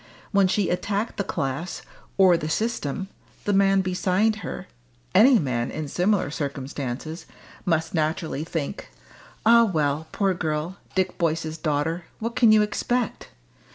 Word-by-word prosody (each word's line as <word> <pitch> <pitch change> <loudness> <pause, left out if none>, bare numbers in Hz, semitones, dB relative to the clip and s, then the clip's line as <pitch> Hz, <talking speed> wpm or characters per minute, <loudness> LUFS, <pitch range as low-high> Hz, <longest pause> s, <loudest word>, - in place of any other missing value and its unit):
When 200 -2 +4
she 195 +1 +1
attacked 200 +4 -2
the 200 - 0
class, 140 +1 -3 0.3
or 190 -3 +6
the 155 -2 -2
system, 195 -3 -2 0.4
the 205 - +1
man 195 0 +4
beside 190 +3 +1
her - - -6 0.5
any 255 +2 +7
man 125 - -1
in 155 -1 -4
similar 180 0 +1
circumstances 140 +1 -5 0.4
must 165 -2 0
naturally 155 -2 -1
think: 165 +2 -4 0.6
"Ah, 235 +1 +7
well, 155 -5 0
poor 195 -2 +1
girl 160 +2 -2 0.2
Dick 185 -1 0
Boyce's 160 -1 -1
daughter 160 +2 -1
what 230 +1 -4
can 230 -3 +6
you 215 -1 +6
expect?" 240 +3 -2
175 Hz, 135 wpm, -25 LUFS, 155-200 Hz, 0.6 s, any